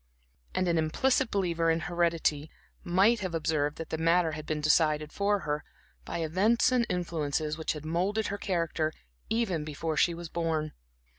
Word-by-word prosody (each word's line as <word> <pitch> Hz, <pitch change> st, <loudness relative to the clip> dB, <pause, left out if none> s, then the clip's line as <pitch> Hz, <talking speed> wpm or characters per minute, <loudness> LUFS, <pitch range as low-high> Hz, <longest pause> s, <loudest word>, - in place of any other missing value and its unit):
And 185 Hz, -, +1 dB
an 170 Hz, -1 st, +2 dB
implicit 250 Hz, +11 st, +1 dB
believer 170 Hz, -4 st, +1 dB
in 165 Hz, 0 st, +2 dB
heredity 165 Hz, -3 st, 0 dB, 0.3 s
might 195 Hz, +7 st, +3 dB
have 185 Hz, -4 st, -3 dB
observed 150 Hz, -2 st, 0 dB
that 165 Hz, -, -7 dB
the 160 Hz, -, -2 dB
matter 165 Hz, 0 st, +3 dB
had 155 Hz, 0 st, -7 dB
been 155 Hz, -1 st, -1 dB
decided 155 Hz, 0 st, +2 dB
for 205 Hz, 0 st, +1 dB
her, 150 Hz, -1 st, -2 dB, 0.4 s
by 165 Hz, -, -3 dB
events 200 Hz, +10 st, +3 dB
and 245 Hz, -2 st, +2 dB
influences 155 Hz, -4 st, -1 dB
which 160 Hz, 0 st, -2 dB
had 155 Hz, -1 st, -8 dB
moulded 190 Hz, +7 st, 0 dB
her 200 Hz, -, -4 dB
character 165 Hz, -4 st, -1 dB, 0.4 s
even 210 Hz, -9 st, 0 dB
before 155 Hz, +1 st, -3 dB
she 170 Hz, +2 st, +3 dB
was 170 Hz, 0 st, -7 dB
born. 160 Hz, -2 st, -2 dB
165 Hz, 165 wpm, -29 LUFS, 155-185 Hz, 0.4 s, might